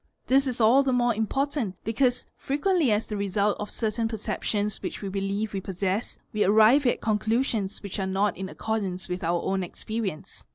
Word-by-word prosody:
This 270 +1 +3
is 250 -2 -3
all 235 +5 +6
the 270 -1 +1
more 245 -1 +3
important 230 0 -1
because 245 +2 +1
frequently 295 - +1
as 210 +1 +1
the 210 - -5
result 200 +1 +1
of 210 - -4
certain 225 0 -1
perceptions 210 -1 -2
which - - -4
TS - - -9
e - - -3
believe 200 +2 -2
we 195 - -2
possess, 190 +4 -2 0.2
we 215 - +2
arrive 220 +7 +5
at - - +1
conclusions 220 -1 0
which 200 0 -5
are 190 - -1
not 195 +1 +1
in 190 0 -5
accord 220 +1 -2
ar 185 -2 -3
ce 185 - -6
with 180 0 -4
our 170 +1 0
own 190 0 0
experience. 195 -1 -5
215 Hz, 200 wpm, -26 LUFS, 195-240 Hz, 0.2 s, all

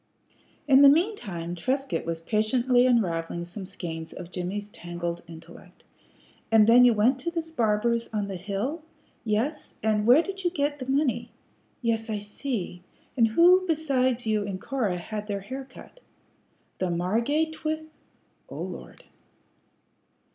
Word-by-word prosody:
In 270 -1 +7
the 280 - +10
mean 350 +9 +3
time 175 - -6
Trescott 255 - -2
was 165 -1 -2
patiently 240 +6 +2
unravelling 170 -7 0
some 185 +2 -8
skeins 165 -4 -6
of 180 -1 -9
Jimmie's 195 +3 -4
tangled 175 -3 -5
intellect. 165 0 -14 0.7
"And 220 -1 +7
then 235 +3 +7
you 240 -2 +5
went 245 +6 +3
to 300 - -2
this 330 -1 -4
barber's 230 -2 0
on 210 -2 -2
the 195 - -5
hill. 205 - -3 0.4
Yes. 235 +8 -2
And 215 -1 +1
where 265 +7 +7
did 390 0 -6
you 350 - +2
get 290 -3 -1
the 255 - -6
money? 275 -1 +1 0.5
Yes. 225 -1 0
I 215 - -1
see. 205 -3 -5 0.3
And 230 -4 +4
who 350 +10 +5
besides 260 -7 +1
you 215 -1 +1
and 195 -2 -4
Cora 215 -7 -1
had 210 +4 -6
their 200 -2 -3
hair 260 +7 -6
cut? 270 - -15 0.8
The 185 - 0
Margate 230 - 0
twi 315 0 -3 0.7
Oh, - - -8
lord!" - - -9
225 Hz, 145 wpm, -26 LUFS, 190-275 Hz, 0.8 s, the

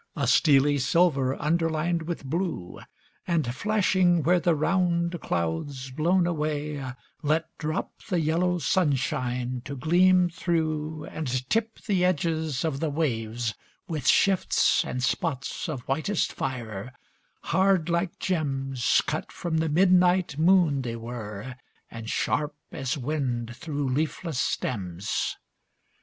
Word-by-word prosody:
A 140 - 0
steely 140 +2 +4
silver, 135 -2 +2
underlined 165 +1 0
with 170 -5 -4
blue, 155 - -3 0.5
And 160 -9 0
flashing 185 -1 +2
where 180 +3 +4
the 170 -1 +2
round 170 +1 +1
clouds, 90 - -2
blown 170 +6 +2
away, 150 -3 -2 0.4
Let 155 +1 0
drop 155 0 -3
the 180 -4 +1
yellow 170 +3 +1
sunshine 130 -7 0
to 140 - -5
gleam 180 +5 +4
through 155 -3 -2
And 160 -3 -5 0.2
tip 225 0 0
the 195 -4 +1
edges 160 -5 0
of 145 -4 -1
the 160 - 0
waves 120 -6 -1 0.3
with 155 -5 -3
shifts 195 -2 +4
And 125 0 -4
spots 140 +3 -2
of 140 -5 -4
whitest 155 - -1
fire, 120 -3 -4 0.5
hard 190 -3 +2
like 170 +1 -1
gems 135 -7 0
Cut - - -3
from 170 -2 -2
the 160 0 +1
midnight 180 0 +4
moon 160 -3 +4
they 120 -2 -4
were, 115 0 -7 0.3
and 115 -1 -7
sharp 150 0 0 0.2
As 135 +2 -2
wind 125 -4 -2
through 145 +1 -3
leafless 155 +2 -1
stems. 95 -8 -2
155 Hz, 120 wpm, -26 LUFS, 130-170 Hz, 0.5 s, steely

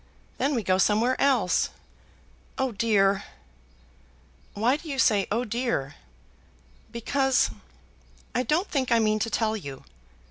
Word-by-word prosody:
Then 280 +2 +1
we 230 - -1
go 185 0 +1
somewhere 220 +6 +3
else. 250 -10 +2 0.9
Oh 265 -1 0
dear!" 200 -3 +2 1.3
"Why 235 +6 +2
do 310 +2 -9
you 275 - -3
say 205 -6 +3
'oh 230 +4 +1
dear'?" 235 - -2 1.0
"Because; 265 +3 +1 0.8
I 250 - +1
don't 315 +9 0
think 260 -4 -1
I 235 - +5
mean 215 -1 +2
to 230 - -1
tell 220 0 0
you." 140 -10 -8
230 Hz, 130 wpm, -26 LUFS, 210-260 Hz, 1.3 s, I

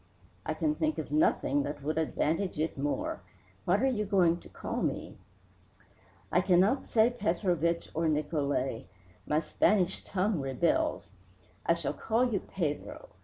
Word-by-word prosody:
"I - - -1
can 305 -1 +1
think 310 0 -1
of - - -5
nothing 300 - +2
that 145 0 -5
would 155 +2 0
advantage 165 +3 0
it 155 +2 -1
more. 145 +1 -2 0.4
What 195 +7 +2
are - - +5
you 230 -5 0
going 180 -4 +3
to - - -15
call - - -4
me?" - - -3 1.1
"I 180 - +4
cannot 190 +8 +3
say 225 +1 +4
Petrovich 175 - 0
or 165 +1 0
Nicolai 145 - -1 0.4
my 150 - +2
Spanish 185 +4 +1
tongue 195 -1 0
rebels. 170 - 0 0.6
I - - +5
shall - - -2
call 235 +2 +1
you 200 - +2
Pedro. 160 -7 -4
175 Hz, 145 wpm, -30 LUFS, 155-215 Hz, 1.1 s, are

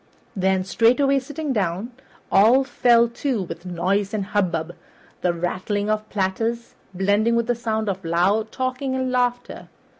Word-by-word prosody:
Then, 190 -1 +1
straightway 255 +7 +3
sitting 290 +2 -4
down, 195 +2 -2 0.4
all 230 +7 +5
fell 240 -3 +3
to 235 -2 -2
with 180 0 -8
noise 195 +4 -1
and 200 -2 -2
hubbub, 175 -5 -1 0.5
the 180 - +2
rattling 185 +4 -2
of 215 0 -2
platters 225 +4 -2 0.2
blending 205 +5 +1
with 235 -1 +1
the 245 - +1
sound 220 -2 -2
of 190 -1 -3
loud 190 +7 +1
talking 260 +1 -2
and 260 -1 -1
laughter. 245 -1 -1
215 Hz, 145 wpm, -22 LUFS, 190-245 Hz, 0.5 s, all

